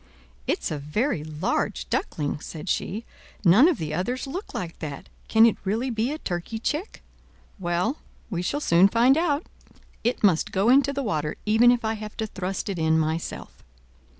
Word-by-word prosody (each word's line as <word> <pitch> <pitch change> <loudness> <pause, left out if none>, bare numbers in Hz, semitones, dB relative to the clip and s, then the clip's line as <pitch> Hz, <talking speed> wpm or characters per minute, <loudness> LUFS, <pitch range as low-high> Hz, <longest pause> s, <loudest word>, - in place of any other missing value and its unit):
"It's - - -1
a 150 - -2
very 150 - -1
large 150 - -2
duckling," 145 -1 -1
said 160 +3 -7
she; 215 +7 -2 0.4
"none 205 - +7
of 355 - +2
the 155 -1 -4
others 240 +10 -2
look 350 +10 -6
like 170 -2 -5
that: 145 -3 -7 0.2
can 220 0 +6
it 230 - +3
really 225 +7 -1
be 230 +3 0
a 305 - -3
turkey 175 - -4
chick? 300 - -3 0.6
Well, 180 - 0 0.3
we 175 -3 -1
shall 285 +11 -2
soon 175 - +5
find 235 +6 +4
out. 315 -1 +1 0.6
It 240 0 0
must 180 -6 +3
go 200 +4 +2
into 275 +2 +5
the 280 0 -3
water, 155 - -1
even 220 +3 +5
if 245 -2 +2
I 220 - +1
have 215 -1 -8
to 220 - -1
thrust 190 -2 -4
it 195 -4 -3
in 160 0 +3
myself." 160 +1 -3
210 Hz, 180 wpm, -25 LUFS, 165-245 Hz, 0.6 s, none